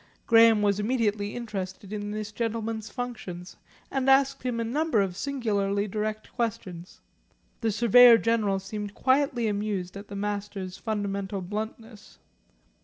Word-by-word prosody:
Graham 225 Hz, -2 st, +6 dB
was 200 Hz, 0 st, +2 dB
immediately 210 Hz, -2 st, 0 dB
interested 200 Hz, -4 st, -6 dB
in 205 Hz, -1 st, -4 dB
this 215 Hz, 0 st, -4 dB
gentleman's 225 Hz, -1 st, -3 dB
functions, 205 Hz, -8 st, -6 dB, 0.4 s
and 270 Hz, -1 st, 0 dB
asked 270 Hz, 0 st, +4 dB
him 245 Hz, -2 st, -2 dB
a -, -, 0 dB
number 285 Hz, +1 st, 0 dB
of 190 Hz, -3 st, 0 dB
singularly 205 Hz, -5 st, -1 dB
direct 215 Hz, +1 st, -4 dB
questions. 190 Hz, -7 st, -4 dB, 0.6 s
The 225 Hz, -2 st, 0 dB
Surveyor 235 Hz, +2 st, +7 dB
General 220 Hz, -4 st, +1 dB
seemed 205 Hz, +1 st, -6 dB
quietly 260 Hz, -3 st, +2 dB
amused 200 Hz, -3 st, -2 dB
at 200 Hz, +1 st, -8 dB
the 200 Hz, -, -8 dB
Master's 200 Hz, -2 st, -4 dB
fundamental 200 Hz, -3 st, -3 dB
bluntness. 215 Hz, +2 st, -7 dB
215 Hz, 130 wpm, -27 LUFS, 200-230 Hz, 0.6 s, Surveyor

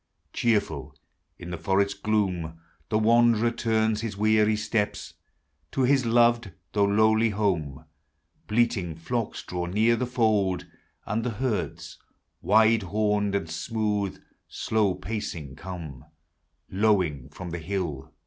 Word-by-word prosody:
Cheerful 115 Hz, -3 st, 0 dB, 0.4 s
in 90 Hz, 0 st, -8 dB
the 85 Hz, -, -5 dB
forest 100 Hz, +1 st, 0 dB
gloom, 90 Hz, -7 st, -1 dB, 0.3 s
The 110 Hz, -, +2 dB
wanderer 115 Hz, +1 st, +4 dB
turns 110 Hz, -2 st, 0 dB
his 110 Hz, -3 st, -4 dB
weary 110 Hz, 0 st, +3 dB
Bteps 105 Hz, -1 st, -2 dB, 0.6 s
To 135 Hz, -, 0 dB
liis 130 Hz, -2 st, +3 dB
loved, 120 Hz, -3 st, +3 dB, 0.2 s
though 100 Hz, -1 st, +3 dB
lowly 110 Hz, +2 st, +3 dB
home. 90 Hz, -10 st, -1 dB, 0.6 s
Bleating 105 Hz, -7 st, +1 dB
Hocks 115 Hz, +8 st, -3 dB
draw 90 Hz, -1 st, -4 dB
near 110 Hz, +6 st, +3 dB
the 125 Hz, +1 st, -2 dB
fold; 110 Hz, -7 st, +1 dB, 0.4 s
And 110 Hz, +2 st, -1 dB
the 125 Hz, -, -1 dB
herds, 115 Hz, 0 st, -3 dB, 0.4 s
Wide 110 Hz, +1 st, +4 dB
homed, 105 Hz, +1 st, 0 dB
and 80 Hz, -5 st, -1 dB
smooth, 105 Hz, +4 st, -2 dB, 0.3 s
slow 105 Hz, -4 st, 0 dB
pacing 85 Hz, -10 st, -5 dB
come 80 Hz, -8 st, -8 dB, 0.7 s
Lowing 95 Hz, -, +1 dB
from 90 Hz, +4 st, -8 dB
the 85 Hz, -, -4 dB
hill. 80 Hz, -6 st, -4 dB
105 Hz, 120 wpm, -26 LUFS, 90-110 Hz, 0.7 s, wanderer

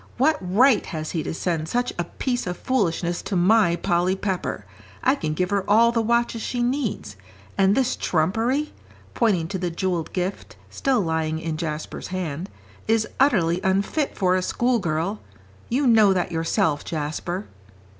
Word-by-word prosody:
"What 300 Hz, +5 st, +3 dB
right 210 Hz, +6 st, +4 dB
has 155 Hz, -1 st, -4 dB
he 165 Hz, -, -1 dB
to -, -, -4 dB
send 160 Hz, -2 st, -2 dB
such 245 Hz, +1 st, 0 dB
a 175 Hz, -, 0 dB
piece 245 Hz, +5 st, -3 dB
of 180 Hz, 0 st, -3 dB
foolishness 175 Hz, -8 st, 0 dB
to 195 Hz, 0 st, -4 dB
my 185 Hz, 0 st, +4 dB
Polly 175 Hz, +2 st, +1 dB
Pepper? 190 Hz, -2 st, -3 dB, 0.4 s
I 260 Hz, -, +4 dB
can 155 Hz, -, -3 dB
give 180 Hz, +3 st, -1 dB
her 200 Hz, -1 st, +1 dB
all 230 Hz, +3 st, +6 dB
the 230 Hz, -1 st, +1 dB
watches 235 Hz, 0 st, +1 dB
she 245 Hz, +1 st, -2 dB
needs. 240 Hz, -, -2 dB, 0.4 s
And 195 Hz, +1 st, +3 dB
this 260 Hz, -1 st, +1 dB
trumpery," 225 Hz, -, 0 dB, 0.4 s
pointing 195 Hz, -9 st, +1 dB
to 190 Hz, -1 st, -3 dB
the 180 Hz, -1 st, -1 dB
jewelled 170 Hz, -1 st, -2 dB
gift 185 Hz, +1 st, -4 dB, 0.2 s
still 265 Hz, -5 st, +1 dB
lying 160 Hz, -2 st, -1 dB
in 160 Hz, -1 st, -3 dB
Jasper's 155 Hz, -1 st, -5 dB
hand, 180 Hz, -1 st, -4 dB, 0.4 s
"is 220 Hz, 0 st, +2 dB
utterly 185 Hz, -, +3 dB
unfit 200 Hz, +10 st, 0 dB
for 185 Hz, -1 st, +2 dB
a 185 Hz, -, +1 dB
schoolgirl. 195 Hz, -4 st, 0 dB, 0.5 s
You 270 Hz, +4 st, +1 dB
know 220 Hz, -5 st, +6 dB
that 180 Hz, -1 st, -1 dB
yourself, 160 Hz, -2 st, 0 dB
Jasper." 165 Hz, +5 st, -3 dB
190 Hz, 160 wpm, -23 LUFS, 170-235 Hz, 0.5 s, all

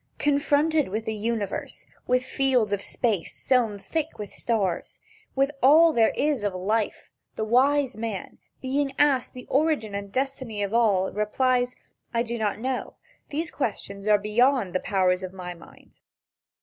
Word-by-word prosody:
Confronted 290 Hz, +1 st, +2 dB
with 215 Hz, +3 st, -3 dB
the 220 Hz, -, -2 dB
universe, 215 Hz, -2 st, -3 dB, 0.2 s
with 250 Hz, 0 st, +2 dB
fields 260 Hz, -6 st, +1 dB
of 200 Hz, -, -1 dB
space 210 Hz, -5 st, -1 dB
sown 235 Hz, -5 st, +1 dB
thick 315 Hz, +9 st, -3 dB
with 210 Hz, -2 st, -7 dB
stars, 200 Hz, -7 st, -1 dB, 0.4 s
with 275 Hz, +1 st, +2 dB
all 315 Hz, +5 st, +7 dB
there 225 Hz, -1 st, +4 dB
is 285 Hz, -6 st, 0 dB
of 200 Hz, -3 st, -1 dB
life, 210 Hz, +4 st, -2 dB, 0.2 s
the -, -, -2 dB
wise 265 Hz, +3 st, +3 dB
man, 220 Hz, -4 st, -5 dB, 0.2 s
being 275 Hz, +1 st, 0 dB
asked 275 Hz, -5 st, +2 dB
the 250 Hz, -, -9 dB
origin 280 Hz, -7 st, +1 dB
and 200 Hz, 0 st, -5 dB
destiny 260 Hz, -5 st, -2 dB
of 200 Hz, +1 st, -3 dB
all, 205 Hz, -5 st, +3 dB
replies: 245 Hz, +4 st, +1 dB, 0.4 s
"I 230 Hz, -, +2 dB
do 235 Hz, 0 st, -4 dB
not 210 Hz, -2 st, 0 dB
know. 255 Hz, +3 st, -3 dB, 0.3 s
These 320 Hz, +3 st, -3 dB
questions 200 Hz, -5 st, -4 dB
are 210 Hz, -1 st, +6 dB
beyond 215 Hz, 0 st, +2 dB
the 185 Hz, -, +1 dB
powers 185 Hz, -2 st, +1 dB
of 185 Hz, 0 st, -6 dB
my 180 Hz, -2 st, -6 dB
mind." 170 Hz, -, -18 dB
230 Hz, 155 wpm, -25 LUFS, 205-270 Hz, 0.4 s, all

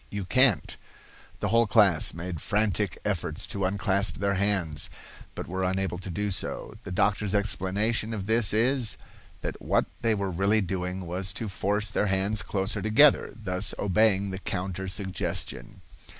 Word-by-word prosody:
You 100 Hz, -2 st, -4 dB
can't." 125 Hz, -, +3 dB, 0.6 s
The -, -, 0 dB
whole 115 Hz, 0 st, +4 dB
class 100 Hz, -7 st, +4 dB
made 85 Hz, -1 st, -6 dB
frantic 105 Hz, -4 st, 0 dB
efforts 90 Hz, -6 st, -2 dB
to 100 Hz, -2 st, -2 dB
unclasp 100 Hz, +1 st, +1 dB
their 100 Hz, -1 st, 0 dB
hands, 95 Hz, -6 st, 0 dB, 0.5 s
but -, -, -5 dB
were 95 Hz, +1 st, -3 dB
unable 95 Hz, -1 st, -1 dB
to 95 Hz, -, -8 dB
do 100 Hz, +4 st, -2 dB
so. 95 Hz, -, -3 dB
The 100 Hz, -, -7 dB
doctor's 105 Hz, +2 st, +1 dB
explanation 105 Hz, +2 st, 0 dB
of 105 Hz, -4 st, -4 dB
this 110 Hz, 0 st, +2 dB
is, 120 Hz, +1 st, +2 dB, 0.4 s
that -, -, -5 dB
what -, -, +2 dB, 0.2 s
they 115 Hz, -1 st, +2 dB
were 100 Hz, -2 st, -2 dB
really 100 Hz, +5 st, +2 dB
doing 90 Hz, 0 st, -3 dB
was 90 Hz, +3 st, -2 dB
to 115 Hz, -, -4 dB
force 105 Hz, +2 st, -1 dB
their 105 Hz, -, +1 dB
hands 95 Hz, +2 st, 0 dB
closer 100 Hz, +3 st, -2 dB
together, 125 Hz, +9 st, +5 dB
thus 95 Hz, -1 st, 0 dB
obeying 100 Hz, -1 st, +2 dB
the 95 Hz, -, -5 dB
counter 95 Hz, 0 st, -4 dB
suggestion. 95 Hz, -, -4 dB
100 Hz, 155 wpm, -27 LUFS, 95-105 Hz, 0.6 s, together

